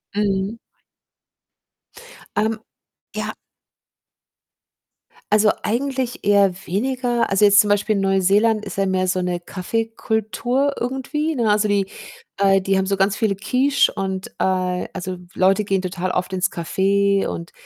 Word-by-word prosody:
Mhm. 200 Hz, +1 st, -1 dB, 1.8 s
Ähm, 220 Hz, +1 st, 0 dB, 0.6 s
ja. -, -, -3 dB, 2.0 s
Also, 210 Hz, 0 st, +5 dB
eigentlich 260 Hz, +1 st, -2 dB
eher 200 Hz, -2 st, +4 dB
weniger. 245 Hz, +5 st, -1 dB
Also, 195 Hz, +1 st, +4 dB
jetzt 200 Hz, 0 st, +6 dB
zum 210 Hz, -, +4 dB
Beispiel 205 Hz, +1 st, +2 dB
Neuseeland 200 Hz, +3 st, +2 dB
ist -, -, -7 dB
ja 195 Hz, -, +2 dB
mehr 185 Hz, 0 st, 0 dB
so 185 Hz, 0 st, 0 dB
'ne 180 Hz, -1 st, -2 dB
Kaffeekultur 225 Hz, +7 st, -2 dB
irgendwie, 270 Hz, +5 st, -2 dB
ne? 230 Hz, -5 st, +2 dB
Also, 210 Hz, 0 st, +2 dB
die 200 Hz, -1 st, +1 dB, 0.5 s
äh, 195 Hz, -1 st, +4 dB
die 195 Hz, 0 st, +1 dB
haben 190 Hz, -, -1 dB
so 195 Hz, 0 st, 0 dB
ganz 195 Hz, +2 st, +2 dB
viele 215 Hz, -4 st, 0 dB
Quiche 255 Hz, +8 st, +2 dB
und 190 Hz, -1 st, -4 dB
äh, 185 Hz, -1 st, 0 dB
also, 185 Hz, +1 st, -5 dB, 0.2 s
Leute 195 Hz, +3 st, +3 dB
gehen 195 Hz, -1 st, 0 dB
total 185 Hz, 0 st, -3 dB
oft 180 Hz, +1 st, -2 dB
ins 185 Hz, 0 st, 0 dB
Café 195 Hz, +3 st, +1 dB
und 170 Hz, 0 st, -6 dB
200 Hz, 135 wpm, -21 LUFS, 190-225 Hz, 2.0 s, jetzt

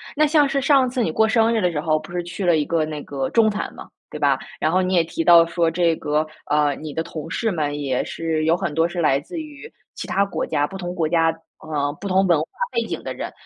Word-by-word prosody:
那 305 Hz, +1 st, +4 dB
像 295 Hz, -2 st, +3 dB
是 275 Hz, -, 0 dB
上 270 Hz, -2 st, +3 dB
次 250 Hz, -1 st, -1 dB
你 160 Hz, -, -1 dB
过 220 Hz, +6 st, +3 dB
生 225 Hz, 0 st, +3 dB
日 225 Hz, -, +1 dB
的 180 Hz, -, +1 dB
时 155 Hz, -, -2 dB
候， 155 Hz, 0 st, +1 dB
不 155 Hz, +3 st, -12 dB
是 175 Hz, 0 st, -2 dB
去 175 Hz, +3 st, -6 dB
了 170 Hz, -2 st, +4 dB
一 150 Hz, -, 0 dB
个 165 Hz, 0 st, 0 dB
那 155 Hz, -1 st, -6 dB
个 135 Hz, -2 st, -3 dB
中 225 Hz, -2 st, +4 dB
餐 210 Hz, 0 st, -3 dB
吗， -, -, -10 dB, 0.2 s
对 -, -, -7 dB
吧？ -, -, +2 dB, 0.2 s
然 155 Hz, -, +1 dB
后 185 Hz, +2 st, +3 dB
你 185 Hz, 0 st, 0 dB
也 170 Hz, -, +4 dB
提 165 Hz, 0 st, -3 dB
到 170 Hz, -1 st, +7 dB
说 170 Hz, 0 st, 0 dB
这 165 Hz, 0 st, +1 dB
个 150 Hz, +1 st, 0 dB, 0.2 s
呃， 150 Hz, -1 st, +2 dB
你 155 Hz, 0 st, -8 dB
的 160 Hz, -, -1 dB
同 160 Hz, -1 st, -7 dB
事 225 Hz, +6 st, -1 dB
们 145 Hz, -4 st, -2 dB
也 135 Hz, -3 st, -1 dB
是 160 Hz, -1 st, -2 dB
有 165 Hz, +2 st, +3 dB
很 170 Hz, -5 st, -3 dB
多 165 Hz, +2 st, +2 dB
是 175 Hz, 0 st, -5 dB
来 140 Hz, -4 st, +3 dB
自 325 Hz, -, -7 dB
于 305 Hz, +7 st, -10 dB, 0.2 s
其 -, -, -7 dB
它 200 Hz, -, +1 dB
国 195 Hz, -, -3 dB
家， 145 Hz, -2 st, +1 dB
不 190 Hz, +5 st, -8 dB
同 175 Hz, -1 st, -5 dB
国 165 Hz, -3 st, 0 dB
家 165 Hz, 0 st, +3 dB, 0.3 s
呃， 145 Hz, -2 st, -2 dB
不 200 Hz, -, -4 dB
同 190 Hz, 0 st, +3 dB
文 170 Hz, -4 st, +3 dB
化 155 Hz, -, -2 dB, 0.3 s
背 465 Hz, -, 0 dB
景 -, -, -5 dB
的 -, -, -4 dB
人。 -, -, -6 dB
170 Hz, 295 characters per minute, -22 LUFS, 155-200 Hz, 0.3 s, 到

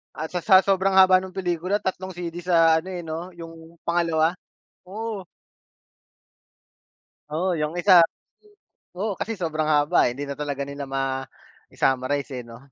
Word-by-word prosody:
At 155 Hz, +3 st, -5 dB
sa 180 Hz, -, -2 dB
sa 190 Hz, +1 st, +6 dB
sobrang 195 Hz, 0 st, +1 dB
haba 185 Hz, -1 st, +7 dB
ng 185 Hz, 0 st, -8 dB
pelikula, 185 Hz, +2 st, -1 dB
tatlong 185 Hz, -1 st, -4 dB
CD 175 Hz, -1 st, -6 dB
sa 165 Hz, -2 st, +5 dB
ano, 170 Hz, -, -7 dB
eh, 175 Hz, -, -5 dB
'no, 165 Hz, +3 st, -6 dB
yung 165 Hz, 0 st, -12 dB
pangalawa? 170 Hz, 0 st, +1 dB, 0.4 s
Oo. 205 Hz, +1 st, -6 dB, 2.1 s
Oo, 175 Hz, +2 st, 0 dB
'yong 150 Hz, 0 st, -2 dB
isa 175 Hz, -1 st, +7 dB, 0.9 s
oo. 205 Hz, +1 st, -2 dB
Kasi 225 Hz, -, -3 dB
sobrang 155 Hz, -3 st, -1 dB
haba, 150 Hz, 0 st, +3 dB
eh, 120 Hz, -, -8 dB
di 145 Hz, -, -3 dB
na 140 Hz, -, -5 dB
talaga 145 Hz, -1 st, -4 dB
nila 140 Hz, 0 st, -6 dB
mai-summarize, 135 Hz, +1 st, -3 dB
eh, -, -, -8 dB
'no? 115 Hz, 0 st, -11 dB
170 Hz, 145 wpm, -24 LUFS, 150-185 Hz, 2.1 s, haba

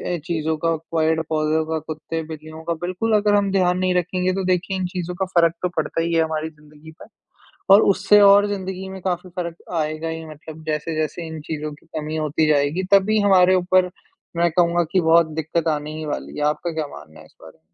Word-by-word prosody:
अ, -, -, -3 dB
चीज़ों 160 Hz, -2 st, -1 dB
का 165 Hz, +1 st, 0 dB, 0.2 s
पेड़-पौधों 160 Hz, -1 st, +1 dB
का, 160 Hz, 0 st, -2 dB
कुत्ते-बिल्लियों 155 Hz, 0 st, -7 dB
का 170 Hz, +1 st, -1 dB
बिल्कुल 185 Hz, +5 st, 0 dB
अगर 210 Hz, 0 st, +3 dB
हम 200 Hz, -1 st, +2 dB
ध्यान 180 Hz, -2 st, +2 dB
नहीं 185 Hz, 0 st, +1 dB
रखेंगे 180 Hz, +1 st, 0 dB
तो 195 Hz, 0 st, -2 dB
देखिए 185 Hz, +1 st, 0 dB
इन 185 Hz, -, -2 dB
चीज़ों 180 Hz, -1 st, -5 dB
का 190 Hz, +1 st, -1 dB
फ़र्क 170 Hz, -1 st, +4 dB
तो 180 Hz, -, 0 dB
पड़ता 160 Hz, +1 st, -1 dB
ही 170 Hz, +1 st, -1 dB
है 165 Hz, -1 st, +4 dB
हमारी 160 Hz, 0 st, -3 dB
ज़िंदगी 150 Hz, 0 st, -16 dB
पे -, -, -9 dB, 0.7 s
और 205 Hz, -, +8 dB
उससे 210 Hz, +2 st, +4 dB
और 200 Hz, 0 st, +7 dB
ज़िंदगी 190 Hz, -1 st, -4 dB
में 190 Hz, 0 st, -8 dB
काफ़ी 180 Hz, 0 st, -3 dB
फ़र्क 170 Hz, -1 st, -4 dB, 0.2 s
आएगा 155 Hz, 0 st, -2 dB
ही 160 Hz, 0 st, -5 dB
मतलब 155 Hz, +1 st, -11 dB
जैसे-जैसे 155 Hz, +1 st, -2 dB
इन 160 Hz, 0 st, -7 dB
चीज़ों 150 Hz, 0 st, -5 dB
की 145 Hz, -, -18 dB
कमी 155 Hz, 0 st, -4 dB
होती 155 Hz, 0 st, 0 dB
जाएगी, 150 Hz, +4 st, +1 dB
तभी 210 Hz, +2 st, +4 dB
हमारे 185 Hz, -2 st, +5 dB
ऊपर 185 Hz, 0 st, +2 dB, 0.5 s
मैं 170 Hz, 0 st, +2 dB
कहूँगा 175 Hz, 0 st, +2 dB
कि 185 Hz, -, +3 dB
बहुत 165 Hz, 0 st, +4 dB
दिक्कत 165 Hz, +1 st, -2 dB
आने 150 Hz, 0 st, -2 dB
ही 155 Hz, -, -5 dB
वाली 150 Hz, -, -5 dB
है। 150 Hz, -, -1 dB
आपका 150 Hz, +3 st, -1 dB
क्या 155 Hz, -2 st, -3 dB
मानना 75 Hz, +1 st, -14 dB
है -, -, -14 dB
इस -, -, -24 dB
बारे -, -, -14 dB
में? -, -, -41 dB
165 Hz, 210 wpm, -21 LUFS, 155-185 Hz, 0.7 s, और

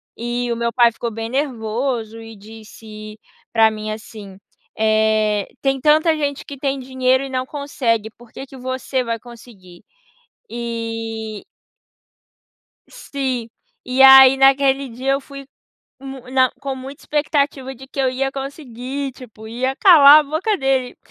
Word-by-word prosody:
e 240 Hz, +1 st, -3 dB
o -, -, -1 dB
meu 235 Hz, 0 st, -2 dB
pai 235 Hz, -1 st, +4 dB
ficou 235 Hz, 0 st, -5 dB
bem 225 Hz, +1 st, -5 dB
nervoso 235 Hz, -3 st, -3 dB
e 225 Hz, -1 st, -12 dB
disse 215 Hz, 0 st, -12 dB, 0.3 s
pra 225 Hz, -1 st, +4 dB
mim 215 Hz, 0 st, -6 dB
assim, 210 Hz, -3 st, -10 dB, 0.4 s
eh, 215 Hz, -1 st, +1 dB, 0.2 s
"Tem 270 Hz, -1 st, 0 dB
tanta 310 Hz, +2 st, +3 dB
gente 285 Hz, -2 st, -3 dB
que 280 Hz, -, -9 dB
tem 275 Hz, 0 st, -2 dB
dinheiro 260 Hz, 0 st, 0 dB
e -, -, -8 dB
não 255 Hz, 0 st, -2 dB
consegue, 250 Hz, -7 st, -2 dB
por 235 Hz, -2 st, -18 dB
que 270 Hz, -, -9 dB
que 270 Hz, -, -14 dB
você 260 Hz, 0 st, -3 dB
vai 230 Hz, -1 st, -3 dB
conseguir?" 220 Hz, -7 st, -15 dB, 0.7 s
E 225 Hz, -2 st, -5 dB, 1.7 s
sim, 255 Hz, -4 st, -2 dB, 0.4 s
e 255 Hz, +1 st, 0 dB
aí 265 Hz, 0 st, +9 dB
naquele 270 Hz, 0 st, +3 dB
dia 255 Hz, +4 st, -3 dB
eu 275 Hz, 0 st, 0 dB
fui 275 Hz, 0 st, -11 dB, 0.6 s
mu 270 Hz, -1 st, -8 dB
na 260 Hz, -1 st, +3 dB
com 275 Hz, -1 st, -4 dB
muita 265 Hz, +2 st, -10 dB
expectativa 285 Hz, -3 st, -1 dB
de 265 Hz, +2 st, -13 dB
que 275 Hz, -, -8 dB
eu 260 Hz, -1 st, +2 dB
ia 270 Hz, +1 st, -2 dB
conseguir, 270 Hz, -1 st, -6 dB
tipo, 220 Hz, -4 st, -13 dB
ia 255 Hz, +4 st, -2 dB
calar 305 Hz, -6 st, +8 dB
a -, -, 0 dB
boca 320 Hz, +9 st, -1 dB
dele, 265 Hz, -2 st, -1 dB
255 Hz, 150 wpm, -19 LUFS, 225-270 Hz, 1.7 s, aí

